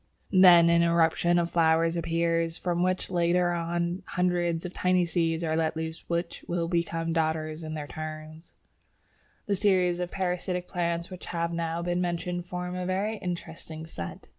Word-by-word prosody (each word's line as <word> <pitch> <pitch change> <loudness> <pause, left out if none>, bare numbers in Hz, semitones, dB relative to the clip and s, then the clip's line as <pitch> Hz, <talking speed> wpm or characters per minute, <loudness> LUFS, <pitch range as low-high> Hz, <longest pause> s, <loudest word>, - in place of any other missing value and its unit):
Then 180 -3 +8
an 170 0 +5
eruption 170 +1 +3
of 170 -1 0
flowers 165 0 +3
appears, 165 0 0
from 175 -1 -1
which 185 +1 0
later 175 0 +2
on 170 +1 -2
hundreds 175 -2 0
of 180 - -5
tiny 180 -1 +2
seeds 165 -1 0
are 160 -1 0
let 160 -1 0
loose 160 0 -5
which 170 0 -2
will 170 -1 -1
become 165 -1 -1
Dodders 160 0 -1
in 155 0 -5
their 150 -1 -4
turn. 155 +1 -7 1.0
The 200 - +1
series 185 -3 +2
of 180 -1 -2
parasitic 180 -1 -2
plants 170 -1 -2
which 185 - -9
have 170 0 -2
now 165 0 -2
been 175 0 0
mentioned 175 0 -2
form 180 0 -4
a 180 - -3
very 200 +4 -1
interesting 165 -3 -6
set. 85 - -8
170 Hz, 165 wpm, -28 LUFS, 165-180 Hz, 1.0 s, Then